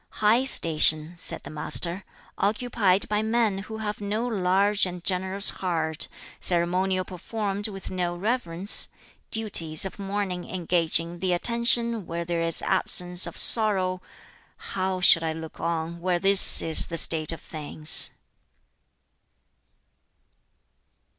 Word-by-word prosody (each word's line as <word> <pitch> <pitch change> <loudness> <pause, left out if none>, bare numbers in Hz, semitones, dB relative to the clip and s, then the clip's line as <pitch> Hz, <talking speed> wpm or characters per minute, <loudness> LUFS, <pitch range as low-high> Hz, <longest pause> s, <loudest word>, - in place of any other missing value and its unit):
"High 220 +5 +1
station," 155 -6 +3
said 170 - -1
the - - -11
Master, 170 +4 -1 0.3
"occupied 205 -2 -1
by 210 0 -2
men 220 -3 -1
who 220 +2 -9
have 210 -1 -7
no 210 +3 -4
large 200 -2 0
and 180 -1 -10
generous 190 +2 +1
heart; 160 -4 -4 0.3
ceremonial 185 +2 0
performed 200 +2 -6
with 195 -2 -10
no 175 -2 -4
reverence; 195 -2 0 0.4
duties 185 -8 +3
of 190 +1 -9
mourning 195 -2 -6
engaging 170 -1 -2
the 185 0 -2
attention, 235 0 0
where 170 +1 -6
there 170 0 -4
is 165 -1 +2
absence 180 -1 +2
of 170 - -10
sorrow; 190 -5 +3 0.7
how 185 -1 -4
should 165 -2 +5
I 160 -1 -3
look 160 0 -11
on, 165 0 -5
where 180 0 -1
this 195 +2 +6
is 160 -1 +4
the 165 - -5
state 160 -1 +3
of 165 - -8
things?" 155 0 +3
185 Hz, 125 wpm, -23 LUFS, 170-205 Hz, 0.7 s, this